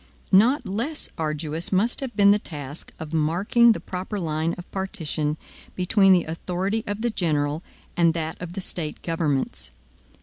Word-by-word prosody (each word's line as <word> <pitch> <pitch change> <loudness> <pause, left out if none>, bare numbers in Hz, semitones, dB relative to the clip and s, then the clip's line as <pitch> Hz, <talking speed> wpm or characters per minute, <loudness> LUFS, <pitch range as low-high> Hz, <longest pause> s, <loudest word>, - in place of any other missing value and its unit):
Not 240 +8 +5
less 235 +11 -3
arduous 155 +1 -2
must 205 +5 +2
have 265 -3 -5
been 200 -1 +6
the 205 - +4
task 145 -4 -6
of 160 0 -7
marking 185 +10 +4
the - - -5
proper 190 +3 -5
line 160 -1 -1
of 175 - -10
partition 160 -5 -2 0.4
between 195 +2 +4
the 180 -2 +5
authority 185 +6 -2
of 205 +1 -3
the 240 0 +1
general 150 -5 0 0.3
and 170 -1 +3
that 160 -1 -3
of 175 -1 -6
the 195 - -4
State 160 -4 -4
governments. 155 - -1
175 Hz, 160 wpm, -24 LUFS, 160-200 Hz, 0.4 s, been